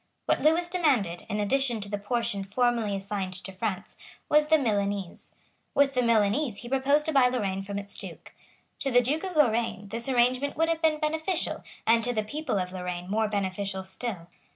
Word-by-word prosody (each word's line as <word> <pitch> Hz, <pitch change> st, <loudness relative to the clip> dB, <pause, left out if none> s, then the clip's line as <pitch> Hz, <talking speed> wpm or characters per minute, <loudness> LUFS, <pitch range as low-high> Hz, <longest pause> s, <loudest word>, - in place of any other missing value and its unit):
What -, -, +1 dB
Lewis 325 Hz, +3 st, +3 dB
demanded, 270 Hz, -, +1 dB
in 210 Hz, -, -1 dB
addition 240 Hz, +2 st, +1 dB
to 200 Hz, -, -5 dB
the 205 Hz, 0 st, -3 dB
portion 205 Hz, -2 st, -2 dB
formerly 230 Hz, 0 st, +1 dB
assigned 195 Hz, -1 st, -4 dB
to 185 Hz, +1 st, -7 dB
France, 190 Hz, 0 st, -4 dB, 0.3 s
was 300 Hz, 0 st, +4 dB
the 315 Hz, +1 st, +5 dB
Milanese. 200 Hz, -, -2 dB, 0.4 s
With 280 Hz, -1 st, +4 dB
the 250 Hz, -, +2 dB
Milanese 230 Hz, +1 st, +2 dB
he 240 Hz, -, -8 dB
proposed 275 Hz, +3 st, +2 dB
to 315 Hz, -, 0 dB
buy 270 Hz, -4 st, +5 dB
Lorraine 200 Hz, -7 st, -1 dB
from 200 Hz, +1 st, -5 dB
its 200 Hz, 0 st, -7 dB
Duke. -, -, -9 dB, 0.5 s
To 275 Hz, -, -1 dB
the 245 Hz, -1 st, +5 dB
Duke 300 Hz, +8 st, -1 dB
of 375 Hz, -3 st, -4 dB
Lorraine 230 Hz, -7 st, +1 dB
this 230 Hz, +4 st, -4 dB
arrangement 255 Hz, +2 st, +2 dB
would 325 Hz, +1 st, +2 dB
have 330 Hz, -1 st, 0 dB
been 315 Hz, -2 st, +2 dB
beneficial, 320 Hz, +3 st, -2 dB, 0.2 s
and 230 Hz, 0 st, +4 dB
to 245 Hz, +1 st, 0 dB
the 215 Hz, -2 st, 0 dB
people 295 Hz, +1 st, -3 dB
of 180 Hz, -1 st, -2 dB
Lorraine 180 Hz, 0 st, -5 dB
more 220 Hz, +1 st, +2 dB
beneficial 195 Hz, -1 st, -2 dB
still. 190 Hz, -2 st, -4 dB
230 Hz, 190 wpm, -27 LUFS, 200-280 Hz, 0.5 s, the